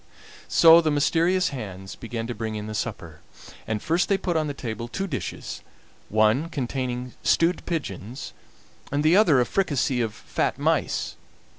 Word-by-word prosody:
So 165 0 +7
the 160 - +1
mysterious 165 +5 +2
hands 95 -8 -7
began 115 -1 -5
to 120 - -4
bring 110 -1 -4
in 105 0 -4
the 110 - -6
supper, 85 -8 -5 0.5
and 110 -1 -2
first 170 +3 +1
they 195 - +3
put 180 -2 -2
on 155 -1 +1
the 145 - -3
table 115 -3 -5
two 190 +10 -3
dishes, 145 -10 -5 0.5
one 110 +9 +3
containing 125 -3 -3
stewed 170 +2 +2
pigeons 125 - -4 0.6
and 145 +1 0
the 155 +3 +5
other 175 -10 +5
a 125 - +3
fricassee 140 -9 0
of 110 -2 -2
fat - - -2
mice. - - 0
130 Hz, 160 wpm, -25 LUFS, 110-165 Hz, 0.6 s, So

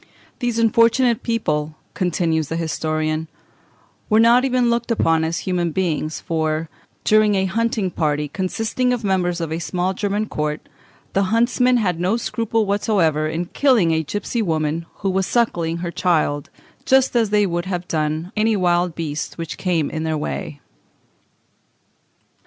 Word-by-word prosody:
These 240 -2 -1
unfortunate 230 +1 +3
people," 155 -10 -1 0.2
continues 165 -3 0
the 165 - -3
historian, 155 -1 -2 0.8
"were 215 0 +4
not 235 +2 +6
even 255 -2 +2
looked 235 0 -1
upon 165 -8 +2
as 160 +1 -1
human 180 -2 -1
beings, 155 -3 -1
for, 160 -1 -2 0.3
during 215 -1 +4
a 190 0 +1
hunting 220 -1 0
party, 150 -3 0
consisting 225 - -1
of 240 -2 -3
members 180 -3 0
of 165 -2 -3
a 160 - -2
small 180 +2 -1
German 205 +2 -1
court, 150 -6 -3 0.5
the 195 0 +2
huntsmen 240 +4 +2
had 180 -7 0
no 185 +6 +1
scruple 225 -2 -1
whatever 190 -7 +1
in 165 +3 -2
killing 240 - +3
a 160 0 +2
gipsy 205 - -3
woman 160 -3 -1
who 195 - -2
was 190 0 0
suckling 170 -9 0
her 170 0 -4
child, 155 -5 0 0.3
just 265 -1 +3
as 230 -3 +3
they 210 0 +3
would 175 -1 -2
have 180 -2 -4
done 155 +2 -2
any 220 +1 +2
wild 175 -2 +1
beast 155 -2 -4
which 165 -1 -5
came 170 -5 0
in 155 - -3
their 160 -1 -1
way." 150 -1 -5
180 Hz, 150 wpm, -21 LUFS, 160-220 Hz, 0.8 s, not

